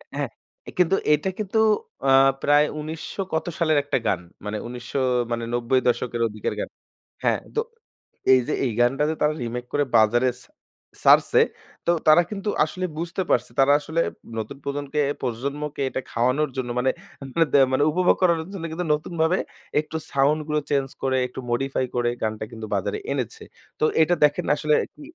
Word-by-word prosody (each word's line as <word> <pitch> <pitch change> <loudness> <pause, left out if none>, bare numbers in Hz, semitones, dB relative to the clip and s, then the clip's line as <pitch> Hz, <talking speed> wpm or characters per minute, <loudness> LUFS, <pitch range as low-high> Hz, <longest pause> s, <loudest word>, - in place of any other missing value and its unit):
হ্যাঁ, - - -2 0.5
কিন্তু 180 +1 +4 0.2
এটা 150 +6 +1
কিন্তু 215 +1 0 0.5
আ - - +6 0.3
প্রায় 145 +1 +5
১৯০০ 160 +5 -5
কত 160 0 0
সালের 155 -2 +3
একটা 145 - 0
গান। 90 - +1 0.2
মানে 105 +1 -3
১৯০০ 125 +3 -5 0.3
মানে 115 0 -1
৯০ 120 +2 +2
দশকের, 120 -1 0
ওইদিকের 110 -1 -3
গান। - - -3 0.5
হ্যাঁ? - - +2 0.2
তো - - +2 0.7
এইযে 125 -2 +2
এই 125 - 0
গানটা 135 +4 +3
যে 160 - -1
তারা 150 0 +3
রিমেক 120 +1 -4
করে 145 - +3
বাজারে 120 +4 +4
ছা - - -22 0.5
ছাড়ছে, - - +6 0.5
তো 170 - +4 0.2
তারা 155 +3 +8
কিন্তু 205 0 -3 0.2
আসলে 185 +4 -4
বুঝতে 170 +3 -3
পারছে। 120 0 +2
তারা 140 +1 +6
আসলে 160 +3 -3 0.4
নতুন 110 +6 -6
প্রজনকে 145 +1 -3 0.2
প্রজন্মকে 140 +4 -3
এটা 130 - -3
খাওয়ানোর 130 +5 +1
জন্য 125 -2 -2
মানে 130 - +2 0.6
দে - - +7 0.2
মানে 145 - +3
উপভোগ 180 +2 +3
করানোর 170 -2 +2
জন্য 185 - -6
কিন্তু 175 +2 -3
নতুনভাবে 160 +3 0 0.4
একটু 160 +1 -6
সাউন্ডগুলো 150 +2 +1
চেঞ্জ 140 -2 +1 0.2
করে, 130 -1 +1
একটু 125 - -9
modify 135 +1 0
করে 120 -1 +1
গানটা 110 0 -2
কিন্তু 110 -1 -7
বাজারে 95 - -1
এনেছে। - - -3 0.4
তো - - -1 0.2
এইটা 160 +3 +4
দেখেন 145 0 0
আসলে 150 0 +2 0.2
কি - - -15
145 Hz, 160 wpm, -24 LUFS, 125-160 Hz, 0.7 s, তারা